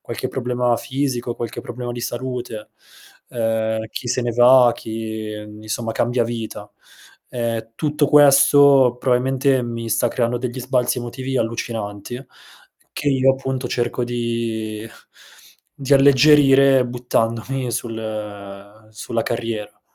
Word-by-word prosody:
qualche - - -5
problema 125 -1 0
fisico, 130 -3 -3
qualche 115 -2 -5
problema 120 0 -6
di 120 - -6
salute, 120 -2 -5 0.6
ehm, 110 -1 -1
chi 120 - -6
se 125 +1 0
ne 120 - -1
va, 120 +1 +6
chi 110 -1 -6 0.3
insomma 110 +1 -4
cambia 120 +1 0
vita. 110 -3 -6 0.6
Ehm, 115 -2 -3
tutto 150 +1 0
questo 140 -3 +6
probabilmente 130 +1 +1
mi 115 -1 -5
sta 120 - +2
creando 120 0 -1
degli 125 +1 -4
sbalzi 125 -1 0
emotivi 130 +2 -5
allucinanti 115 +1 -4 0.7
che 145 - -1
io 135 -1 +4
appunto 130 -1 -4
cerco 120 0 -2
di 115 -2 -3 0.9
di 140 0 +1
alleggerire 135 -1 +5
buttandomi 120 +1 -2
sul 105 -2 -7
sulla 115 +1 -3
carriera. 115 -3 -4
120 Hz, 115 wpm, -20 LUFS, 115-130 Hz, 0.9 s, va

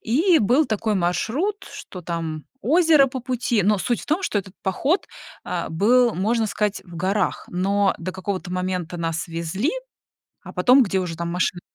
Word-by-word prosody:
И 320 - +3
был 250 +7 +3
такой 215 0 -1
маршрут, 220 - -1
что 185 - -9
там 165 -3 -4 0.2
озеро 310 -1 +5
по 260 0 -5
пути. 245 -4 0
Но 205 +1 +3
суть 240 +4 -1
в - - -11
том, 315 +6 0
что 215 - 0
этот 190 -1 -8
поход, 270 - 0 0.4
а, - - -3
был, 235 +7 +3
можно 220 +4 +1
сказать, 210 0 -1
в 175 -2 -11
горах. 190 +3 0
Но 195 +2 +1
до 185 +2 -5
какого-то 190 0 -4
момента 180 -2 -3
нас 165 0 -3
везли, 170 - -2 0.7
а - - -10
потом, 260 +2 +5
где 195 -4 0
уже 175 -3 -4
там 170 +1 -3
машина 180 0 0
200 Hz, 175 wpm, -23 LUFS, 180-250 Hz, 0.7 s, озеро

